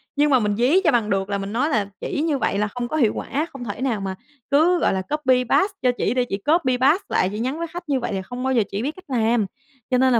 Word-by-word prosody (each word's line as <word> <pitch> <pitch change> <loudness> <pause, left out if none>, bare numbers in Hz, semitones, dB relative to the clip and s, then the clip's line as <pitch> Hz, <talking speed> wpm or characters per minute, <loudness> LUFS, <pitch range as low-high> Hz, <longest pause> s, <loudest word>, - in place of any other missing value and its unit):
nhưng 295 +1 +3
mà 260 - +5
mình 205 -2 0
dí 270 - +3
cho 325 - +4
bằng 230 -3 +1
được 195 0 0
là 200 - 0
mình 195 +2 -5
nói 260 +6 +1
là 210 -8 +1
"Chỉ 290 - -2
như 310 -3 +1
vậy 200 - 0
là 210 - +1
không 240 +3 -4
có 310 - -2
hiệu 230 -7 +3
quả. 300 +4 -2
Không 260 -3 -7
thể 210 +3 -5
nào 235 -6 0
mà 190 -1 -3 0.4
cứ, 330 +5 +4
gọi - - +2
là, 190 - -1
copy 260 +2 +1
paste 395 +1 +3
cho 250 -1 +3
chỉ - - 0
để 250 -1 +1
chỉ 195 - -1
copy 265 - +1
paste 290 +10 +3
lại 185 - +2
chị 210 - -5
nhắn 260 +6 -2
với 335 - -2
khách 345 0 -9
như 275 -2 +2
vậy 240 - -3
là 190 - -2
không 245 +6 -7
bao 265 - +1
giờ 235 -4 +3
chị 200 - -2
biết 280 +5 -1
cách 370 - -14
làm." 230 -3 +2 0.5
Cho 250 - +4
nên 260 0 +4
là 235 - +4
250 Hz, 305 wpm, -22 LUFS, 210-295 Hz, 0.5 s, mà